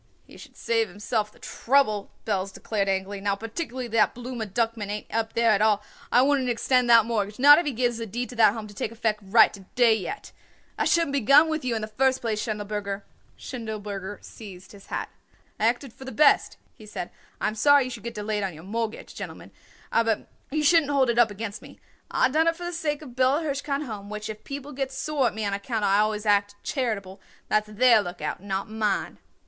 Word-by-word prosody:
"He -, -, -16 dB
should -, -, -14 dB
save 225 Hz, -1 st, +1 dB
himself 210 Hz, +3 st, -2 dB
the -, -, -22 dB
trouble," 230 Hz, -6 st, +1 dB, 0.2 s
Belz 195 Hz, -2 st, -1 dB
declared 200 Hz, 0 st, -2 dB
angrily. 195 Hz, +1 st, -2 dB
"Now 200 Hz, 0 st, 0 dB
particularly 240 Hz, +4 st, -5 dB
that 225 Hz, 0 st, +2 dB
Blooma 245 Hz, -2 st, -5 dB
Duckman 225 Hz, 0 st, -1 dB
ain't 210 Hz, 0 st, -6 dB
up 225 Hz, 0 st, -1 dB
there 230 Hz, -1 st, +3 dB
at 210 Hz, -1 st, +2 dB
all, 210 Hz, -1 st, +3 dB, 0.3 s
I 250 Hz, -, +5 dB
wouldn't 270 Hz, -2 st, +2 dB
extend 245 Hz, +1 st, +2 dB
that 230 Hz, -2 st, +7 dB
mortgage, 210 Hz, -3 st, -2 dB
not 290 Hz, +4 st, +8 dB
if 345 Hz, -, -2 dB
he -, -, +1 dB
gives 240 Hz, -1 st, 0 dB
a 230 Hz, -, -4 dB
deed 240 Hz, +5 st, -4 dB
to 250 Hz, -, -9 dB
that 215 Hz, -3 st, +6 dB
Home 220 Hz, -1 st, -6 dB
to 205 Hz, -, -12 dB
take 210 Hz, -, -3 dB
effect 225 Hz, -2 st, -1 dB
right 215 Hz, +3 st, +5 dB
to 200 Hz, -, -10 dB, 0.2 s
day 240 Hz, -3 st, +5 dB
yet. 220 Hz, -, -5 dB, 0.4 s
I -, -, -1 dB
shouldn't 335 Hz, -4 st, +2 dB
begun 280 Hz, +4 st, +5 dB
with 315 Hz, -2 st, -2 dB
you 245 Hz, -2 st, -1 dB
in 220 Hz, -, -3 dB
the -, -, -3 dB
first 260 Hz, +4 st, +1 dB
place, 220 Hz, -2 st, -2 dB
Schindelberger." 205 Hz, -2 st, -4 dB, 0.3 s
Schindelberger 205 Hz, -4 st, -6 dB
seized 185 Hz, -4 st, -11 dB
his 200 Hz, -1 st, -15 dB
hat. -, -, -4 dB, 0.5 s
"I 220 Hz, -, +3 dB
acted 245 Hz, +1 st, -1 dB
for -, -, -12 dB
the 265 Hz, -, -6 dB
best," 295 Hz, 0 st, +4 dB, 0.2 s
he 215 Hz, -, -14 dB
said. 180 Hz, -4 st, -6 dB, 0.3 s
"I -, -, 0 dB
am 215 Hz, -, -1 dB
sorry 285 Hz, +6 st, +5 dB
you 255 Hz, -, -5 dB
should 230 Hz, -3 st, -7 dB
get 235 Hz, +1 st, -6 dB
delayed 210 Hz, 0 st, -2 dB
on 190 Hz, -4 st, -3 dB
your 155 Hz, -, -12 dB
mortgage, 225 Hz, +3 st, -4 dB
gentlemen, -, -, -8 dB, 0.4 s
aber 225 Hz, -2 st, +1 dB, 0.2 s
you 305 Hz, +2 st, -1 dB
shouldn't 315 Hz, -1 st, +4 dB
hold 270 Hz, -4 st, +3 dB
it 235 Hz, -, 0 dB
up 235 Hz, -2 st, +6 dB
against 205 Hz, 0 st, -6 dB
me. -, -, -14 dB, 0.3 s
I -, -, +3 dB
done 315 Hz, +5 st, +2 dB
it 330 Hz, -, +3 dB
for 350 Hz, +1 st, -7 dB
the 350 Hz, -, -4 dB
sake 310 Hz, -3 st, -2 dB
of 285 Hz, -, -9 dB
the 240 Hz, -, -15 dB
Bella 260 Hz, +5 st, +2 dB
Hirshkind 280 Hz, -1 st, -2 dB
Home, 205 Hz, -4 st, -7 dB
which 210 Hz, +1 st, -5 dB
if 215 Hz, -, -11 dB
people 280 Hz, +1 st, -6 dB
gets 270 Hz, -1 st, -4 dB
sore 280 Hz, -2 st, +1 dB
at -, -, -4 dB
me 220 Hz, -1 st, -2 dB
on 200 Hz, -, -1 dB
account 210 Hz, +2 st, -2 dB
I 195 Hz, +1 st, +4 dB
always 215 Hz, 0 st, 0 dB
act 205 Hz, -1 st, +2 dB
charitable, 200 Hz, -8 st, -3 dB, 0.3 s
that's 215 Hz, 0 st, +2 dB
their 230 Hz, +1 st, +5 dB
lookout, 175 Hz, -4 st, -5 dB
not 195 Hz, +1 st, -3 dB
mine." 215 Hz, -2 st, -2 dB
225 Hz, 220 wpm, -25 LUFS, 205-260 Hz, 0.5 s, not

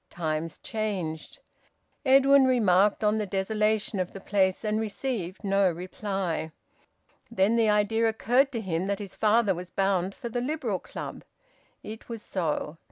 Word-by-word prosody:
Times 160 Hz, -1 st, -3 dB
changed. 195 Hz, -, -4 dB, 0.7 s
Edwin 275 Hz, 0 st, +6 dB
remarked 205 Hz, -5 st, +3 dB
on 210 Hz, +1 st, +2 dB
the 210 Hz, -, -2 dB
desolation 210 Hz, +2 st, 0 dB
of 180 Hz, -1 st, -2 dB
the 195 Hz, -, -7 dB
place 190 Hz, +1 st, 0 dB
and 215 Hz, +1 st, 0 dB
received 210 Hz, -4 st, -4 dB
no 195 Hz, -1 st, +3 dB
reply. 180 Hz, -1 st, -3 dB, 0.8 s
Then 220 Hz, -1 st, +2 dB
the 225 Hz, -2 st, +3 dB
idea 210 Hz, +2 st, +2 dB
occurred 245 Hz, +5 st, +2 dB
to 230 Hz, -, -2 dB
him 180 Hz, -3 st, -2 dB
that 200 Hz, 0 st, -1 dB
his 200 Hz, -2 st, -8 dB
father 215 Hz, -1 st, +3 dB
was 180 Hz, +1 st, -7 dB
bound 195 Hz, -1 st, 0 dB
for -, -, -6 dB
the 240 Hz, +1 st, -2 dB
Liberal 250 Hz, -, -2 dB
Club. -, -, -8 dB, 0.6 s
It 220 Hz, +3 st, -9 dB
was 230 Hz, -2 st, -6 dB
so. 160 Hz, -3 st, -2 dB
205 Hz, 150 wpm, -27 LUFS, 185-225 Hz, 0.8 s, Edwin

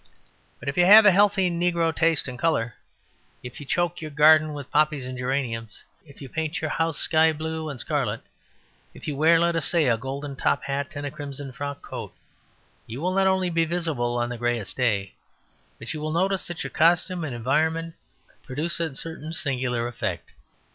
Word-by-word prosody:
But -, -, -11 dB
if 140 Hz, -, -2 dB
you 175 Hz, -, +5 dB
have 210 Hz, +2 st, +10 dB
a 205 Hz, -, +8 dB
healthy 195 Hz, 0 st, +4 dB
negro 170 Hz, -1 st, 0 dB
taste 160 Hz, -3 st, +2 dB
in 130 Hz, -, -6 dB
colour, 120 Hz, -5 st, 0 dB, 0.7 s
if 125 Hz, 0 st, -8 dB
you 145 Hz, -, -10 dB
choke 175 Hz, +2 st, 0 dB
your 155 Hz, -, -5 dB
garden 155 Hz, +1 st, +5 dB
with 145 Hz, -3 st, -8 dB
poppies 150 Hz, -3 st, +2 dB
and 130 Hz, 0 st, -6 dB
geraniums, 125 Hz, -4 st, -3 dB, 0.2 s
if 140 Hz, 0 st, -13 dB
you -, -, -7 dB
paint 160 Hz, +3 st, -3 dB
your 155 Hz, -2 st, -3 dB
house 165 Hz, -2 st, 0 dB
sky 160 Hz, 0 st, +3 dB
blue 160 Hz, 0 st, -4 dB
and 140 Hz, -4 st, -7 dB
scarlet, 125 Hz, -7 st, -2 dB, 0.7 s
if -, -, -10 dB
you 150 Hz, -, -2 dB
wear, 160 Hz, +4 st, +5 dB
let 170 Hz, 0 st, +2 dB
us 165 Hz, -, 0 dB
say, 170 Hz, -4 st, +2 dB
a 115 Hz, -2 st, +3 dB
golden 140 Hz, +3 st, -5 dB
top 140 Hz, -, 0 dB
hat 140 Hz, +1 st, -3 dB
and 145 Hz, 0 st, -4 dB
a 145 Hz, -, -4 dB
crimson 140 Hz, -1 st, -7 dB
frock 140 Hz, +2 st, -6 dB
coat, -, -, -7 dB, 0.7 s
you 115 Hz, +4 st, -6 dB
will 180 Hz, +4 st, -1 dB
not 190 Hz, 0 st, +3 dB
only 190 Hz, -1 st, +1 dB
be 165 Hz, 0 st, +2 dB
visible 160 Hz, -8 st, -1 dB
on 120 Hz, 0 st, -1 dB
the 120 Hz, -1 st, -6 dB
greyest 120 Hz, -4 st, -2 dB
day, 105 Hz, -6 st, 0 dB, 0.6 s
but -, -, -6 dB
you 155 Hz, -, -6 dB
will 155 Hz, 0 st, -2 dB
notice 190 Hz, +3 st, 0 dB
that 175 Hz, -2 st, -5 dB
your 140 Hz, -, -6 dB
costume 175 Hz, +2 st, +2 dB
and 140 Hz, -6 st, -4 dB
environment 160 Hz, +7 st, 0 dB, 0.5 s
produce 150 Hz, +6 st, -3 dB
a 160 Hz, -5 st, -2 dB
certain 160 Hz, +1 st, -6 dB
singular 125 Hz, -6 st, -2 dB
effect. 120 Hz, -2 st, -4 dB
150 Hz, 195 wpm, -25 LUFS, 130-165 Hz, 0.7 s, have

